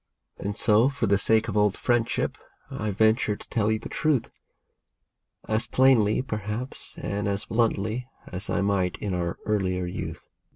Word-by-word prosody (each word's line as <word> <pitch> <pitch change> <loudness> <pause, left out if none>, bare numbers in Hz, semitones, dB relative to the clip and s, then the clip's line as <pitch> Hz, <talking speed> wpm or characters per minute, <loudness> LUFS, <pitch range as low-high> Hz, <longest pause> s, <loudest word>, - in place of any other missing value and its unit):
And 100 +1 -3
so, 115 +3 +4
for 140 - -1
the 100 0 +3
sake 110 +1 +3
of 105 - -3
old 105 -1 +3
friendship, 120 -2 0 0.3
I 110 - -3
venture 110 +2 +2
to - - -14
tell 110 -2 +1
you 110 - +2
the 110 - -8
truth, 150 -6 0 1.2
As 110 +1 +1
plainly, 125 -4 +4
perhaps, 110 +1 -5
and 100 +1 -2
as 100 0 -1
bluntly, 115 +1 0 0.2
as 95 +3 -5
I 100 - +1
might 95 -2 +1
in 100 -3 -3
our 85 -1 -2
earlier 95 -4 0
youth. 90 - -6
105 Hz, 160 wpm, -26 LUFS, 100-115 Hz, 1.2 s, so